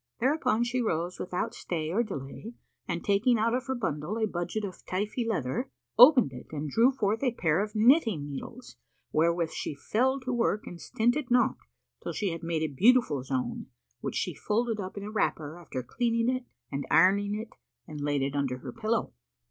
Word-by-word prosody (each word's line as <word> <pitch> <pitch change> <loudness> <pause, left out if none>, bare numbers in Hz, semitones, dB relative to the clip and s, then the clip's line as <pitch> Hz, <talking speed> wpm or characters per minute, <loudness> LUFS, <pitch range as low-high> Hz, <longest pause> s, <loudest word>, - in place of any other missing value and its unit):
Thereupon 255 -3 +2
she 245 +1 0
arose 175 -5 -1
without 180 0 -2
stay 160 -2 -3
or 210 +6 +2
delay 210 - -6 0.3
and 170 -1 -3
taking 210 +4 +3
out 230 +2 +1
of 255 +2 -1
her 265 - -1
bundle 185 - -2
a 220 - +2
budget 205 +2 -3
of 185 -3 -9
Táifí 210 +5 -2
leather,[FN#474] 210 - -1 0.3
opened 250 - +8
it 125 - -9
and 150 -1 -4
drew 230 - +5
forth 220 -4 0
a 260 -3 +2
pair 165 -3 +2
of 210 +1 -4
knitting 220 - +4
needles, 185 - -8 0.3
wherewith 165 +1 +2
she 150 - -4
fell 255 - +1
to 255 0 -3
work 230 -3 0
and 175 - -9
stinted 240 +4 0
not 245 0 +3 0.5
till - - -4
she 200 -4 -1
had 165 - -5
made 165 -2 -1
a 155 -2 -2
beautiful 210 - +4
zone, 130 -1 -3 0.3
which - - -4
she - - -1
folded 225 0 -1
up 190 0 -6
in 200 - -5
a 210 - -6
wrapper 160 -6 -1
after 130 -7 -5
cleaning 230 - 0
it 255 -1 -5 0.3
and 140 0 -3
ironing 200 +4 +4
it, 220 +1 -5 0.4
and 150 -3 -7
laid 145 -1 0
it 140 +1 -2
under 135 -3 0
her 125 - -8
pillow. 225 0 -1
205 Hz, 190 wpm, -29 LUFS, 160-235 Hz, 0.5 s, opened